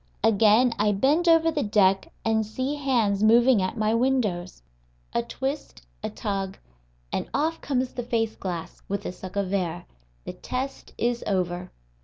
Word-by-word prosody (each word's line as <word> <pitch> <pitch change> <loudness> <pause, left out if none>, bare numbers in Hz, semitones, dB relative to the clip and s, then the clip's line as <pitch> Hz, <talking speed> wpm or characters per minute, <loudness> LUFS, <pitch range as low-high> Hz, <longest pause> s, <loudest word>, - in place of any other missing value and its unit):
Again 225 +3 +5
I 210 0 +3
bend 290 - +2
over 330 0 +5
the 300 -2 -1
deck, 195 -4 +2
and 220 0 +2
see 255 +6 -3
hands 240 -9 +1
moving 235 +1 +5
at 185 +5 -2
my 215 0 +1
windows. 225 - 0 0.5
A 235 - +2
twist, 265 - -5 0.2
a - - -3
tug, 195 -1 -3 0.6
and - - -2
off 315 +4 0
comes 255 -2 -1
the 245 - -3
face 225 -2 -1
glass, 175 -4 -6
with 200 +1 -3
a - - -2
suck 185 +1 -10
of 200 -1 -1
air. 175 - -1 0.4
The - - -6
test 260 +2 -5
is 240 0 0
over. 180 -2 -1
220 Hz, 160 wpm, -26 LUFS, 195-260 Hz, 0.6 s, Again